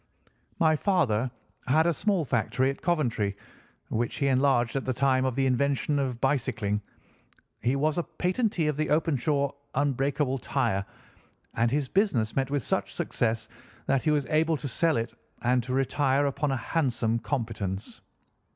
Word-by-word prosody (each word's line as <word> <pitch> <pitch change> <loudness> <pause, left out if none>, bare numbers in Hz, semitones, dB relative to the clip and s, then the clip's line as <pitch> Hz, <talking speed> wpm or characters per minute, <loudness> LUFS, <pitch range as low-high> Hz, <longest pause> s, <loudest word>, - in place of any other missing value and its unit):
My 160 -1 +4
father 140 - +1 0.4
had 155 +5 +4
a 170 - +3
small 190 -1 +1
factory 130 +2 +1
at 140 - -10
Coventry, 120 - 0 0.5
which 115 +1 -1
he 140 - -1
enlarged 130 -2 +2
at 135 - 0
the 130 - -1
time 130 0 +2
of 130 -2 -1
the 135 0 +1
invention 140 +2 +1
of 130 -4 -2
bicycling. 120 -7 0 0.8
He 125 +4 +1
was 150 +4 +1
a - - 0
patentee 185 -1 -1
of 150 - 0
the 155 - 0
Openshaw 145 -2 +1 0.2
unbreakable 135 0 0
tire, 115 -7 0 0.7
and 115 +1 +2
his 140 +1 0
business 130 - +1
met 135 -1 0
with 140 -3 -1
such - - -1
success 115 -1 -1 0.4
that 135 -1 +2
he 155 - 0
was 150 -2 +2
able 160 +1 +3
to 145 - -5
sell 160 +4 +1
it 115 0 -3 0.3
and 125 +1 +3
to 125 +2 -4
retire 135 +1 +2
upon 140 +1 0
a 135 - 0
handsome 120 -5 0
competence. 110 -8 -4
135 Hz, 160 wpm, -27 LUFS, 120-150 Hz, 0.8 s, My